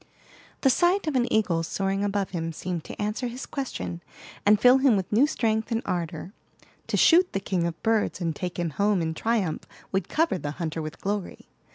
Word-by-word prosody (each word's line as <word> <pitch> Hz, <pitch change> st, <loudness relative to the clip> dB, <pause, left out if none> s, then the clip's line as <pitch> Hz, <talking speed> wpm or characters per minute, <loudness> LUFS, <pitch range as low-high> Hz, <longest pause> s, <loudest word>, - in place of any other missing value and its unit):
The 270 Hz, -, +5 dB
sight 350 Hz, +8 st, +2 dB
of 305 Hz, -3 st, -1 dB
an 245 Hz, -1 st, +1 dB
eagle 185 Hz, -7 st, +2 dB
soaring 195 Hz, +4 st, -1 dB
above 200 Hz, -1 st, -1 dB
him 165 Hz, -2 st, -3 dB
seemed 175 Hz, 0 st, -4 dB
to -, -, -9 dB
answer 210 Hz, +4 st, -2 dB
his 245 Hz, +3 st, -6 dB
question, 255 Hz, -, -5 dB, 0.5 s
and 210 Hz, 0 st, +6 dB
fill 250 Hz, +3 st, +6 dB
him 265 Hz, -4 st, +4 dB
with 190 Hz, -2 st, -3 dB
new 255 Hz, +7 st, +5 dB
strength 220 Hz, -5 st, -1 dB
and 230 Hz, +1 st, 0 dB
ardor. 170 Hz, +1 st, -3 dB, 0.5 s
To -, -, 0 dB
shoot 355 Hz, +2 st, +5 dB
the 195 Hz, -, 0 dB
king 180 Hz, -3 st, -1 dB
of 170 Hz, -1 st, -7 dB
birds 220 Hz, -4 st, +1 dB
and 165 Hz, -3 st, -2 dB
take 180 Hz, -2 st, -4 dB
him 170 Hz, -2 st, -1 dB
home 200 Hz, +3 st, +1 dB
in 160 Hz, 0 st, -1 dB
triumph 200 Hz, -3 st, -1 dB, 0.2 s
would 190 Hz, 0 st, -1 dB
cover 315 Hz, -, +1 dB
the 145 Hz, -2 st, -4 dB
hunter 165 Hz, -2 st, -3 dB
with 155 Hz, 0 st, -7 dB
glory. 200 Hz, -1 st, -4 dB
200 Hz, 200 wpm, -26 LUFS, 170-235 Hz, 0.5 s, and